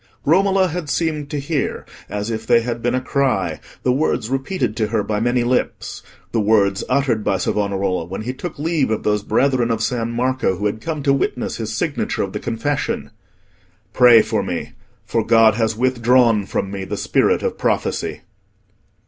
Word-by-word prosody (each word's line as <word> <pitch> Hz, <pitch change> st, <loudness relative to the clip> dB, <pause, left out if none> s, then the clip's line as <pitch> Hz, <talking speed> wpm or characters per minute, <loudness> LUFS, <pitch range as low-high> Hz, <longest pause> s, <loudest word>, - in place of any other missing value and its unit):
Romola 190 Hz, +3 st, +3 dB
had 165 Hz, -2 st, -4 dB
seemed 155 Hz, -3 st, -1 dB
to 145 Hz, -, -3 dB
hear, 145 Hz, 0 st, -2 dB, 0.2 s
as 105 Hz, +2 st, -3 dB
if 110 Hz, 0 st, -4 dB
they 115 Hz, -, +5 dB
had 120 Hz, 0 st, -4 dB
been 120 Hz, +2 st, 0 dB
a -, -, +1 dB
cry, 135 Hz, 0 st, 0 dB, 0.2 s
the 125 Hz, -, +3 dB
words 130 Hz, -4 st, 0 dB
repeated 135 Hz, -, -1 dB
to 110 Hz, -1 st, 0 dB
her 110 Hz, -1 st, 0 dB
by 105 Hz, 0 st, -1 dB
many 120 Hz, +2 st, +1 dB
lips—the 120 Hz, -1 st, -3 dB
words 100 Hz, -2 st, +2 dB
uttered 125 Hz, -5 st, +1 dB
by -, -, +1 dB
Savonarola 100 Hz, -4 st, -1 dB
when 95 Hz, +4 st, -6 dB
he 125 Hz, +3 st, -3 dB
took 155 Hz, +6 st, -7 dB
leave 155 Hz, -2 st, 0 dB
of 110 Hz, -, -1 dB
those 105 Hz, -1 st, +1 dB
brethren 130 Hz, +2 st, +1 dB
of 115 Hz, -1 st, 0 dB
San 115 Hz, -2 st, -1 dB
Marco 125 Hz, -5 st, 0 dB
who 105 Hz, -, -3 dB
had 105 Hz, +2 st, -1 dB
come 155 Hz, -3 st, -4 dB
to 140 Hz, -1 st, +3 dB
witness 130 Hz, -2 st, -1 dB
his 110 Hz, -1 st, -4 dB
signature 150 Hz, +2 st, -1 dB
of 95 Hz, -, -5 dB
the -, -, -3 dB
confession: 120 Hz, +5 st, -2 dB, 0.8 s
"Pray 120 Hz, -3 st, +7 dB
for -, -, -1 dB
me, -, -, -4 dB, 0.3 s
for 115 Hz, -, 0 dB
God 115 Hz, -1 st, +5 dB
has 110 Hz, 0 st, 0 dB
withdrawn 120 Hz, -3 st, +3 dB
from 95 Hz, -, -2 dB
me 100 Hz, -1 st, -4 dB
the -, -, -4 dB
spirit -, -, +1 dB
of -, -, -2 dB
prophecy." -, -, -1 dB
120 Hz, 180 wpm, -20 LUFS, 110-140 Hz, 0.8 s, Pray